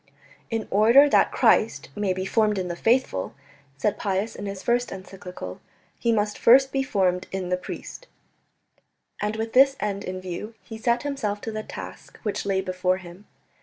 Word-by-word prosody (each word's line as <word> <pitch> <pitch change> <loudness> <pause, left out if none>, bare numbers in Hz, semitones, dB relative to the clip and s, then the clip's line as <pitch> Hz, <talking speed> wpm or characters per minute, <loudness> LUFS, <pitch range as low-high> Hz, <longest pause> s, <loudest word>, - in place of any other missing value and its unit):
"In 225 -2 -2
order 230 +8 +6
that - - +4
Christ - - +2
may 205 -2 0
be 185 0 -2
formed 210 0 +2
in 185 -1 -2
the 175 - -3
faithful," 225 - +1 0.4
said 205 +8 0
Pius 200 +2 -1
in 205 - -6
his 195 -1 -6
first 245 0 +1
encyclical, 180 - -8 0.4
"He 235 - +1
must 210 -2 0
first 265 +3 +6
be 270 - 0
formed 185 -7 0
in 190 -2 -3
the 180 - +2
priest," 340 - -8 1.1
and 210 +1 -1
with 225 +1 -4
this 270 +1 +6
end 200 -1 -2
in 185 0 -5
view 185 +5 -6
he 220 -1 -9
set 235 +3 +1
himself 270 -8 -2
to 225 - -4
the 215 0 -4
task - - -9
which 210 -2 -2
lay 190 -1 +1
before 185 0 0
him. 185 +2 -13
205 Hz, 175 wpm, -25 LUFS, 185-230 Hz, 1.1 s, order